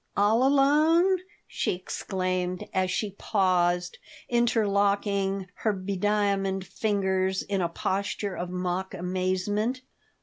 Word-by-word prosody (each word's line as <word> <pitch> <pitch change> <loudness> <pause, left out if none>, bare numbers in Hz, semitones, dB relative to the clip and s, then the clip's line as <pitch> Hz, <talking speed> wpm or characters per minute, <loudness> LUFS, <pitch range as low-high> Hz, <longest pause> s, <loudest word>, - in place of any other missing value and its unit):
All 215 +4 +4
alone?" 305 +7 +4 0.3
she - - -1
exclaimed, 185 0 -3
as 185 -1 +1
she 205 +2 -1
paused, 180 -3 +1 0.3
interlocking 200 -4 +1
her 215 - 0
bediamonded 195 0 0
fingers 190 -2 0
in 195 -2 -1
a 170 - 0
posture 195 +3 -2
of 175 0 -4
mock 180 +1 -3
amazement. 185 +7 -1
195 Hz, 100 wpm, -27 LUFS, 185-210 Hz, 0.3 s, All